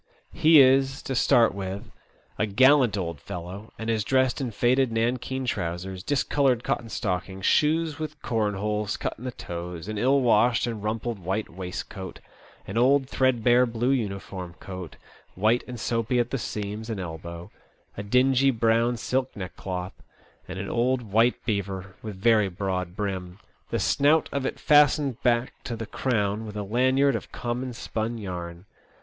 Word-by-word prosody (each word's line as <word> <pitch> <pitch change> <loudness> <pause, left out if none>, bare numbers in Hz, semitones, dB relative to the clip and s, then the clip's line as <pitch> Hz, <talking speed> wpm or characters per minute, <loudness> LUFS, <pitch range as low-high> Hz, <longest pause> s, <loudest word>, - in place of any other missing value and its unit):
He 155 0 +6
is, 135 +1 +3
to 135 - -3
start 125 -2 +4
with, 100 +2 -6 0.5
a 105 - +2
gallant 130 +1 +5
old 85 -5 -3
fellow, 90 - -8
and 110 - -6
is 110 -2 +1
dressed 130 +3 +1
in 130 - -1
faded 125 +3 +2
nankeen 125 +3 -1
trousers, 90 -3 -3
discoloured 135 -1 +1
cotton 115 -1 -2
stockings, 95 -3 -3
shoes 155 0 +2
with 155 -1 -5
corn 110 -3 0
holes 105 +1 -2
cut - - -3
in 125 - -9
the 125 - -2
toes, 85 -3 -7
an 110 -1 -3
ill 135 +4 +3
washed 120 -1 +3
and 115 -4 -4
rumpled 110 +1 -2
white 95 +4 -2
waistcoat, 95 +1 -7 0.5
an 100 +4 -2
old 135 +2 +4
threadbare 125 -1 +3
blue 120 +2 0
uniform 100 -7 -3
coat, 95 -4 -8 0.4
white 110 +6 +2
and 125 -2 -7
soapy 115 +2 0
at 120 0 +1
the 135 - -1
seams 105 +1 -5
and 110 -3 -3
elbow, 85 0 -7 0.4
a - - -5
dingy 130 +5 +3
brown 115 0 +2
silk 130 +3 -1
neckcloth, 90 -2 -5 0.5
and 95 - -6
an 95 +1 -4
old 125 +3 +1
white 115 +4 +4
beaver 100 -4 -3
with 105 -3 -6
very 105 0 +3
broad 90 -1 -3
brim, 95 -3 -4 0.3
the - - -1
snout 150 +2 +3
of 140 -1 -1
it - - -5
fastened 145 -3 +4
back 120 0 +1
to 120 - -4
the 115 0 -5
crown 110 -3 -1
with 105 0 -7
a 105 - -2
lanyard 130 +6 +2
of - - -6
common 125 +1 -3
spun 115 0 -3
yarn. 90 -3 -6
115 Hz, 160 wpm, -26 LUFS, 95-125 Hz, 0.5 s, He